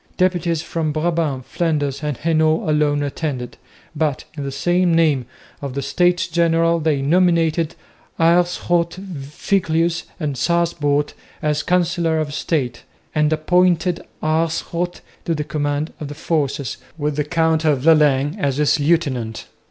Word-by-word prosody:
Deputies 175 -3 +1
from 160 -2 -2
Brabant, 155 -4 -1
Flanders 145 -5 -1
and 150 -4 -2
Hainault 160 0 +1
alone 150 -1 +2
attended, 140 -3 -4 0.4
but 150 -3 -1
in 145 - -5
the 175 +7 +1
name 160 -7 +2 0.3
of 140 -2 -5
the 140 - -2
States 175 +6 +2
General 165 0 +2
they 150 -3 0
nominated 165 0 +2 0.4
Aerschot, 170 0 +2
Viglius 170 0 -1
and 150 -4 -2
Sasbout 150 -1 +1 0.3
as 150 0 +1
Councillors 170 -3 +1
of - - -8
State, 135 -6 -1 0.3
and 150 0 +2
appointed 175 +2 +2 0.2
Aerschot 165 +2 -1 0.2
to 165 - 0
the 150 - -2
command 145 +1 -2
of 150 - -5
the 145 - -7
forces, 145 -6 -1 0.2
with 150 -1 -1
the 150 - 0
Count 160 +1 +1
of 145 -5 +2
Lalaing 150 -2 +4
as 140 -6 0
his 150 +1 +2
lieutenant. 140 -8 0
155 Hz, 130 wpm, -20 LUFS, 145-170 Hz, 0.4 s, Lalaing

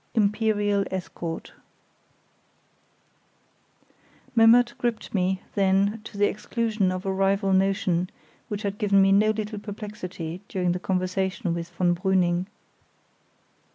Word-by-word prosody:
Imperial 205 -1 +2
Escort 175 -3 -5 2.8
Memmert 235 +1 +6
gripped 235 -3 -2
me, 190 -1 0
then, 200 +2 +2
to 210 - -10
the 205 - +4
exclusion 215 -2 -1
of 185 +1 -4
a 190 - 0
rival 195 0 +1
notion 190 -2 +1 0.4
which 210 +1 -4
had 200 0 -3
given 200 -1 +3
me 195 0 +5
no 210 +2 +5
little 215 -1 -2
perplexity 195 -5 -7
during 180 -2 0
the 180 - -2
conversation 185 +1 -1
with 170 0 -4
von 175 -1 +1
Brüning. 180 0 +1
195 Hz, 115 wpm, -25 LUFS, 185-210 Hz, 2.8 s, Memmert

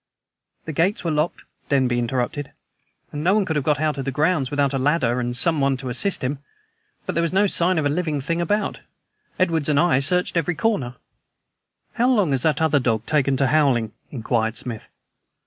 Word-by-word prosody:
"The 155 - -5
gates 180 +8 0
were 170 - -1
locked," 150 +2 -1 0.3
Denby 130 -3 +2
interrupted, 125 +4 -2 0.6
"and 145 0 -5
no 185 +4 +3
one 210 -2 +2
could 160 - -2
have 150 - 0
got 150 0 +1
out 155 -2 -1
of 135 - -4
the - - -1
grounds 150 0 +1
without 145 -1 0
a 135 - 0
ladder 130 -3 +1
and 120 0 -2
someone 140 -1 +2
to 130 0 -6
assist 180 +10 0
him. 135 +2 -2 0.7
But - - -3
there 170 - +1
was 170 - 0
no 195 +3 +3
sign 185 -2 +2
of 155 - 0
a - - +2
living 155 -1 -1
thing 165 +5 -2
about. 205 +5 -1 0.6
Edwards 165 -5 +1
and 145 -1 +3
I 170 -6 +3
searched 180 +5 +1
every 170 +1 0
corner." 155 - -1 1.0
"How 245 +2 +2
long 205 - +2
has 135 -2 +1
that 160 +1 +1
other 155 -2 +3
dog 115 -3 -1
taken 140 -3 +1
to 135 - +2
howling?" 130 -6 +2 0.2
inquired 115 -2 -1
Smith. 115 -4 -6
145 Hz, 200 wpm, -22 LUFS, 130-170 Hz, 1.0 s, no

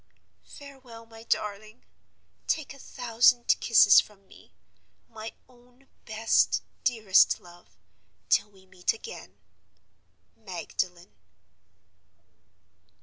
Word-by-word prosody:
Farewell, 260 -5 -13
my 225 0 -15
darling! 215 0 -4 0.6
Take 310 -3 -2
a 275 - -16
thousand 240 -1 +2
kisses 215 -3 +6
from 200 -2 -19
me, - - -20 0.5
my 220 0 -9
own 250 +1 -25 0.2
best, 220 0 +1 0.2
dearest 220 -6 +3
love, 175 0 -19 0.5
till 205 - +2
we 190 -2 -22
meet 185 -1 -2
again. 460 - -11 1.0
"MAGDALEN." 180 -2 -6
225 Hz, 90 wpm, -27 LUFS, 200-245 Hz, 1.0 s, kisses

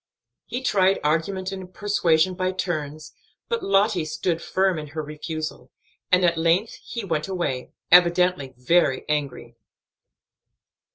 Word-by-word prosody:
He 250 +2 -4
tried 195 -5 +3
argument 185 +5 -1
and 190 -1 -8
persuasion 185 -3 +1
by 185 0 -1
turns, 155 -5 -4 0.4
but 465 -1 -1
Lottie 195 -2 +2
stood 165 +2 -2
firm 190 -2 0
in 150 - -7
her 155 +2 -5
refusal, 155 -3 -6 0.4
and 180 0 +5
at 170 -1 +2
length 170 +7 +1
he 235 -4 -6
went 160 -3 -2
away, 160 -9 -3 0.2
evidently 175 -5 +4
very 130 +1 +2
angry. 140 -5 -3
175 Hz, 125 wpm, -24 LUFS, 155-185 Hz, 0.4 s, and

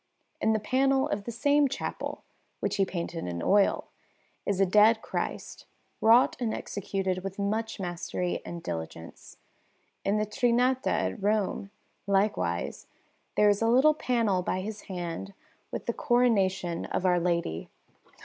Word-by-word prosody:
In 220 - +3
the 220 - +1
panel 265 +5 +2
of 200 0 -3
the 235 - -4
same 285 +5 +3
chapel, 275 - -5 0.4
which - - -1
he 195 - +3
painted 170 - -4
in 85 -1 -4
oil, 200 0 +3 0.6
is 200 -2 0
a 195 - +5
Dead 215 +4 +5
Christ, - - -4 0.3
wrought 230 +3 +6
and 235 -3 -1
executed 190 -2 -3
with 195 0 -5
much 215 +3 -2
mastery 175 0 -3
and 170 -1 -7
diligence. 80 0 -7 0.7
In 200 +2 +1
the 215 - +1
Trinità 250 +3 +1
at - - 0
Rome, 205 -1 0 0.4
likewise, 195 - 0 0.5
there 210 - +5
is 205 0 +3
a 225 - +3
little 260 +6 +5
panel 230 -10 +1
by 185 +1 -2
his 215 +2 -6
hand 180 +1 -5 0.3
with - - -5
the - - -1
Coronation 195 -8 +1
of 190 - -2
Our 180 -1 +4
Lady. 170 - -1
200 Hz, 145 wpm, -28 LUFS, 180-230 Hz, 0.7 s, wrought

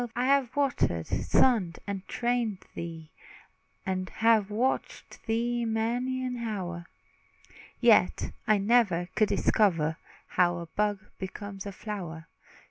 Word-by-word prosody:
I 245 +1 +1
have 270 -2 +2
watered, 255 - +1
sunned, 205 -10 +2
and 195 -2 -5
trained 235 -5 -1
thee, 165 -2 -7 0.7
And 185 -1 -2
have 220 -3 +3
watched 240 +6 -2
thee 235 +2 0
many 240 +3 -1
an 250 -1 -3
hour, 185 -7 -4 0.9
Yet - - +4 0.2
I 215 -1 +5
never 200 -5 +2
could 215 - +2
discover 165 -7 +2 0.3
How 175 -1 +2
a 170 - -5
bud 205 +4 0 0.2
becomes 195 +1 -6
a - - -4
flower. 180 -6 -6
210 Hz, 120 wpm, -28 LUFS, 180-235 Hz, 0.9 s, I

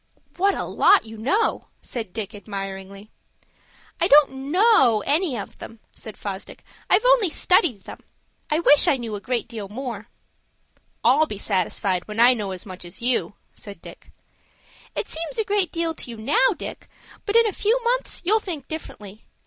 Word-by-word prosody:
"What 395 +2 +2
a - - -3
lot 405 - +4
you 220 0 -10
know!" 375 - 0 0.2
said 225 -6 -5
Dick, 220 +1 -5
admiringly. 195 0 -7 0.9
"I - - +2
don't 275 -2 +4
know 290 - +4
any 300 -3 +1
of 200 - -8
them," 225 - -10
said 220 - -9
Fosdick. 195 -1 -7 0.3
"I've 435 - +4
only - - +5
studied 310 - +2
them. - - -10 0.5
I 305 +1 +1
wish 295 -3 +6
I 275 - +4
knew 230 -3 -6
a 205 - -5
great 250 0 -2
deal 215 -6 -7
more." 230 -2 -6 1.0
"I'll 275 +7 +4
be 210 - -6
satisfied 190 -2 -1
when 210 +1 -6
I 245 +2 +7
know 210 -5 -4
as 185 +3 -6
much 185 -2 -9
as 175 +2 -10
you," 240 -4 0 0.2
said 200 -4 -10
Dick. - - -13 0.8
"It - - -2
seems 330 +9 -5
a 445 - +1
great 405 -3 +1
deal 335 -1 -1
to 280 - -6
you 230 - -7
now, 220 +4 +3
Dick, - - -8 0.4
but 410 - -1
in 465 0 +6
a 425 - 0
few 450 +4 +1
months - - -1
you'll 430 +5 +4
think 325 -10 -6
differently. 215 -9 -9
245 Hz, 175 wpm, -23 LUFS, 205-340 Hz, 1.0 s, I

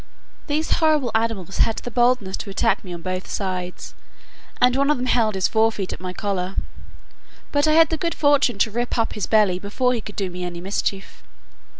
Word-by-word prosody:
These 310 +1 -1
horrible 305 -7 +2
animals 220 -5 -1
had 225 - +2
the 245 - -6
boldness 240 -5 +2
to 205 - -7
attack 195 - +1
me 185 - -9
on 170 -1 -7
both 185 +1 -4
sides, 185 -2 -4 0.7
and 250 0 +4
one 280 +1 +2
of 300 - +3
them 250 - -3
held 225 -4 +2
his 190 - +2
forefeet 220 -3 +1
at - - -8
my 185 0 -4
collar; 190 -1 -3 1.0
but 290 +1 +2
I 310 - +4
had 325 +1 +6
the 320 - -1
good 335 +2 -2
fortune 285 -6 +3
to 220 +2 +2
rip 240 +3 -2
up 230 - 0
his 210 - -3
belly 205 -5 +3
before 250 +6 0
he 235 - -2
could 210 - -10
do 190 -3 -2
me 180 0 -6
any 175 -1 -5
mischief. 195 +1 -3
220 Hz, 205 wpm, -22 LUFS, 190-250 Hz, 1.0 s, had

